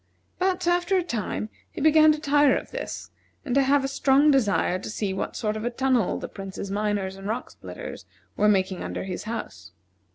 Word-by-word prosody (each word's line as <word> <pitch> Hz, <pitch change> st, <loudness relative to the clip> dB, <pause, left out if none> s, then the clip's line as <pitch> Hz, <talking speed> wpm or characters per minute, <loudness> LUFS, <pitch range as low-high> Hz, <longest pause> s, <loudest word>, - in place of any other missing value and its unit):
But, 370 Hz, -1 st, 0 dB
after 350 Hz, +2 st, +2 dB
a 365 Hz, -, +1 dB
time, 220 Hz, -, -3 dB, 0.2 s
he -, -, -7 dB
began 310 Hz, +1 st, +6 dB
to 305 Hz, -, -1 dB
tire 290 Hz, -2 st, +4 dB
of -, -, -7 dB
this, -, -, -6 dB, 0.3 s
and 255 Hz, -, -2 dB
to 275 Hz, -, +5 dB
have 275 Hz, +1 st, +3 dB
a -, -, 0 dB
strong 275 Hz, +2 st, +4 dB
desire 205 Hz, -8 st, +2 dB
to -, -, -7 dB
see 205 Hz, -2 st, -2 dB
what 190 Hz, -, -4 dB
sort 215 Hz, -1 st, -1 dB
of 215 Hz, -, -4 dB
a 240 Hz, -, 0 dB
tunnel 250 Hz, -3 st, +1 dB
the -, -, -5 dB
Prince's 195 Hz, 0 st, -7 dB
miners 200 Hz, -2 st, -1 dB
and 195 Hz, +1 st, -7 dB
rock 225 Hz, +4 st, -3 dB
splitters -, -, -9 dB, 0.3 s
were 210 Hz, +1 st, +3 dB
making 190 Hz, -2 st, +1 dB
under -, -, -4 dB
his 185 Hz, 0 st, -5 dB
house. 215 Hz, -, -6 dB
240 Hz, 200 wpm, -25 LUFS, 200-295 Hz, 0.3 s, began